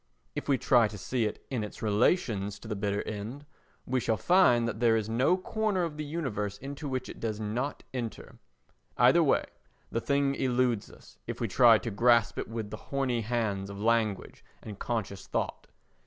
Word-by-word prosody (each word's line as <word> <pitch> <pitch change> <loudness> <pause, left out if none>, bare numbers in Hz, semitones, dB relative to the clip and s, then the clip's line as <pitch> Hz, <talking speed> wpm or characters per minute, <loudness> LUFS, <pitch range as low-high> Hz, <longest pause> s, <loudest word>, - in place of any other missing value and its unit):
If - - -5
we 135 - +4
try 120 -3 +4
to 105 - -8
see 120 +4 -1
it 105 - -5
in 120 -5 -1
its 105 - -8
relations 105 - +1
to 110 - -12
the 110 - -3
bitter 100 0 -1
end, 110 +7 -6 0.4
we 130 0 0
shall 110 -2 0
find 125 - +4
that 115 - -4
there 115 -1 +4
is 110 -2 -2
no 125 +11 +2
corner 210 -1 -1
of 160 -3 -4
the 155 - -3
universe 130 -10 -3
into 140 +5 -6
which 130 -1 -3
it - - -9
does 110 -2 -3
not 120 +7 -3
enter. 120 -3 -6 0.6
Either - - +6
way - - +3 0.5
the 115 - -1
thing 140 +1 +1
eludes 125 -4 0
us - - -17
if - - -5
we - - 0
try 120 -3 +6
to 115 - -5
grasp 115 +1 +3
it - - -3
with 110 -2 -5
the 110 - -5
horny 135 -4 0
hands 105 -4 -1
of 100 0 -7
language 110 -2 0 0.2
and 105 -3 -8
conscious 100 -5 -3
thought. - - -3
115 Hz, 190 wpm, -29 LUFS, 105-130 Hz, 0.6 s, Either